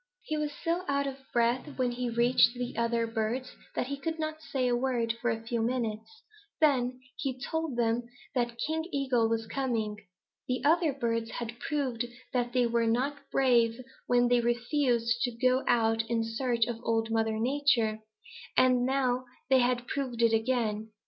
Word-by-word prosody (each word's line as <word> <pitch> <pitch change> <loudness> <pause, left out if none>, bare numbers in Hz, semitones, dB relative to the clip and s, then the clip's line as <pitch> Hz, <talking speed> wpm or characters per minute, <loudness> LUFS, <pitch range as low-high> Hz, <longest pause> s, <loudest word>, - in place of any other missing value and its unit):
"He 310 - -3
was 300 -1 -1
so 340 +2 0
out 280 0 +1
of 275 -1 -4
breath 240 +5 0
when 250 -2 +1
he 245 0 -2
reached 235 +1 +4
the 245 0 -4
other 235 0 +1
birds 225 +3 -2 0.2
that - - 0
he 280 +2 -4
couldn't 310 +1 -3
say 265 -5 -1
a 245 - +2
word 240 -2 0
for 240 - +1
a 225 0 -2
few 230 0 -2
minutes. 235 - -3 0.4
Then 255 -5 +2 0.2
he 260 -2 -3
told 320 -1 -3
them 235 0 0 0.2
that 240 -2 -1
King 320 +1 -1
Eagle 255 -5 +1
was 225 0 -1
coming. 225 -4 -2 0.5
The 250 0 -1
other 325 +1 +4
birds 230 -4 -1
had 235 0 -6
proved 260 -6 -1 0.3
that 245 -1 0
they 250 -1 +3
were 235 0 +1
not 265 +5 0
brave 235 -3 +3 0.3
when 245 0 +4
they 245 0 +4
had 235 - 0
refused 240 -1 +1
to 245 - +1
go 255 +2 +3
out 225 -2 +3
in 230 -1 +1
search 230 0 0
of 235 -1 -4
Old 225 -1 0
Mother 225 -1 +1
Nature, 240 -3 +2 0.6
and 255 -1 +4
now 255 -2 +1 0.3
they 260 -1 +6 0.3
proved 250 -4 -2
it 230 -1 +4
again. 220 -2 0
245 Hz, 170 wpm, -30 LUFS, 230-265 Hz, 0.6 s, they